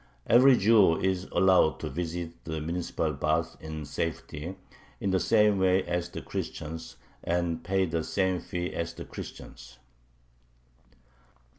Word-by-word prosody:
Every 125 Hz, +2 st, +6 dB
Jew 100 Hz, -5 st, +5 dB
is 95 Hz, -1 st, 0 dB
allowed 95 Hz, -4 st, +4 dB
to -, -, -3 dB
visit 85 Hz, 0 st, -5 dB
the 80 Hz, -1 st, -3 dB
municipal 80 Hz, -1 st, -2 dB
baths 80 Hz, +3 st, 0 dB
in 80 Hz, -1 st, -6 dB
safety, 80 Hz, +3 st, -4 dB, 0.4 s
in 100 Hz, -, -1 dB
the 95 Hz, -, +2 dB
same 105 Hz, -2 st, +3 dB
way 95 Hz, 0 st, +3 dB
as 90 Hz, 0 st, -2 dB
the -, -, -7 dB
Christians, 80 Hz, +2 st, -6 dB, 0.3 s
and 85 Hz, -1 st, -1 dB
pay 95 Hz, 0 st, +1 dB
the 80 Hz, -2 st, -2 dB
same 95 Hz, +2 st, 0 dB
fee 90 Hz, +1 st, -4 dB
as 85 Hz, 0 st, -3 dB
the -, -, -7 dB
Christians." -, -, -10 dB
85 Hz, 135 wpm, -28 LUFS, 80-95 Hz, 0.4 s, Every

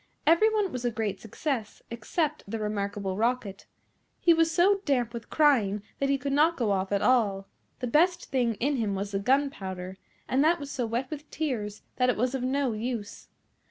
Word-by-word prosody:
Every 335 Hz, +8 st, +5 dB
one 415 Hz, -4 st, 0 dB
was 250 Hz, -1 st, -5 dB
a 245 Hz, -, +2 dB
great 215 Hz, -4 st, -3 dB
success 225 Hz, 0 st, -4 dB
except 300 Hz, +7 st, -2 dB
the 225 Hz, -, -3 dB
Remarkable 200 Hz, -2 st, -2 dB
Rocket. 225 Hz, -3 st, -1 dB, 0.5 s
He 340 Hz, -, +5 dB
was 330 Hz, 0 st, +3 dB
so 385 Hz, +4 st, +3 dB
damp 250 Hz, -, 0 dB
with 235 Hz, -1 st, -7 dB
crying 220 Hz, -10 st, +3 dB, 0.2 s
that 275 Hz, -, +1 dB
he 275 Hz, -, +3 dB
could 275 Hz, +1 st, -3 dB
not 315 Hz, +4 st, +3 dB
go 230 Hz, -5 st, +1 dB
off 190 Hz, 0 st, -1 dB
at 200 Hz, -1 st, +1 dB
all. 205 Hz, -6 st, +2 dB, 0.3 s
The -, -, -1 dB
best 345 Hz, +8 st, +2 dB
thing 245 Hz, -4 st, +1 dB
in 275 Hz, +6 st, 0 dB
him 210 Hz, -4 st, -1 dB
was 200 Hz, +1 st, -3 dB
the 195 Hz, -, -1 dB
gunpowder, 195 Hz, -7 st, -1 dB, 0.3 s
and 265 Hz, +2 st, +2 dB
that 335 Hz, +2 st, +3 dB
was 285 Hz, -1 st, -7 dB
so 250 Hz, -4 st, -2 dB
wet 240 Hz, +5 st, -2 dB
with 300 Hz, 0 st, -7 dB
tears 230 Hz, -9 st, -3 dB
that 250 Hz, 0 st, +3 dB
it 250 Hz, -, +1 dB
was 250 Hz, +3 st, 0 dB
of 265 Hz, -, -2 dB
no 260 Hz, -1 st, 0 dB
use. 220 Hz, -1 st, -5 dB
250 Hz, 195 wpm, -28 LUFS, 210-285 Hz, 0.5 s, Every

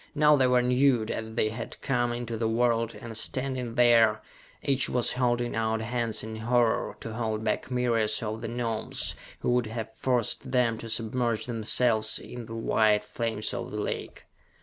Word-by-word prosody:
Now 150 Hz, 0 st, +6 dB
they 130 Hz, -2 st, +3 dB
were 125 Hz, -1 st, +3 dB
nude 125 Hz, -2 st, +3 dB
as 110 Hz, 0 st, -5 dB
they 110 Hz, -, +2 dB
had 115 Hz, +1 st, -7 dB
come 120 Hz, -3 st, +1 dB
into 120 Hz, -1 st, -4 dB
the 110 Hz, 0 st, -1 dB
world 115 Hz, 0 st, +1 dB
and 115 Hz, -3 st, -8 dB
standing 130 Hz, 0 st, -2 dB
there, 115 Hz, -3 st, +5 dB, 0.4 s
each 135 Hz, -1 st, +1 dB
was 125 Hz, -2 st, +2 dB
holding 120 Hz, -1 st, 0 dB
out 110 Hz, 0 st, 0 dB
hands 115 Hz, -1 st, -2 dB
in 110 Hz, 0 st, -6 dB
horror, 120 Hz, 0 st, +1 dB
to 115 Hz, -, -6 dB
hold 110 Hz, -1 st, -2 dB
back 110 Hz, -, -1 dB
myriads 115 Hz, -3 st, +1 dB
of 110 Hz, +1 st, -4 dB
the 115 Hz, -, -4 dB
Gnomes, 115 Hz, -2 st, -1 dB, 0.3 s
who -, -, +1 dB
would 125 Hz, -2 st, +2 dB
have 110 Hz, 0 st, -5 dB
forced 120 Hz, -1 st, -1 dB
them 120 Hz, -3 st, +1 dB
to 115 Hz, -, -7 dB
submerge 115 Hz, 0 st, -1 dB
themselves 115 Hz, -1 st, +2 dB
in 120 Hz, -2 st, -8 dB
the 115 Hz, -, -7 dB
white 110 Hz, -2 st, +2 dB
flames 115 Hz, +1 st, -2 dB
of -, -, -4 dB
the -, -, -6 dB
lake! -, -, -4 dB
115 Hz, 175 wpm, -28 LUFS, 110-125 Hz, 0.4 s, Now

